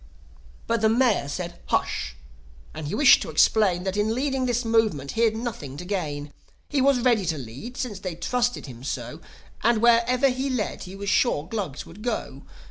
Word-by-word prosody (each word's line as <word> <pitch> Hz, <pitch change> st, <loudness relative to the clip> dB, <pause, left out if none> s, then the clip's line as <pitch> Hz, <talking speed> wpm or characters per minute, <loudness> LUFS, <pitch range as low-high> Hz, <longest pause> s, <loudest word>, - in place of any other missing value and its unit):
But 230 Hz, -1 st, 0 dB
the 220 Hz, -, +4 dB
Mayor 230 Hz, -, +2 dB
said, 175 Hz, +3 st, -5 dB
Hush! -, -, -1 dB, 0.6 s
And 155 Hz, -1 st, -6 dB
he -, -, -2 dB
wished 290 Hz, -, +7 dB
to -, -, -4 dB
explain 190 Hz, -5 st, +3 dB
That 190 Hz, 0 st, -2 dB
in 210 Hz, +2 st, +1 dB
leading 265 Hz, -1 st, 0 dB
this 245 Hz, 0 st, 0 dB
Movement 215 Hz, -12 st, +1 dB
he'd 225 Hz, -1 st, +2 dB
nothing 205 Hz, -, -5 dB
to 180 Hz, -, -7 dB
gain. 150 Hz, -7 st, -3 dB, 0.4 s
He 285 Hz, -2 st, +1 dB
was 270 Hz, -2 st, +3 dB
ready 235 Hz, -5 st, +3 dB
to 160 Hz, -2 st, 0 dB
lead, 135 Hz, -, -8 dB
since 215 Hz, -7 st, -4 dB
they 185 Hz, -3 st, -5 dB
trusted 245 Hz, +8 st, -1 dB
him 125 Hz, -3 st, -10 dB
so; 130 Hz, +2 st, -5 dB, 0.4 s
And, 230 Hz, 0 st, +3 dB
wherever 240 Hz, +3 st, +4 dB
he 260 Hz, +2 st, -2 dB
led 245 Hz, -7 st, -2 dB
he 185 Hz, +1 st, -9 dB
was 200 Hz, 0 st, -4 dB
sure 160 Hz, -, +2 dB
Glugs 190 Hz, -9 st, -4 dB
would 185 Hz, +6 st, -13 dB
go. 215 Hz, -, -3 dB
210 Hz, 185 wpm, -25 LUFS, 155-240 Hz, 0.6 s, wished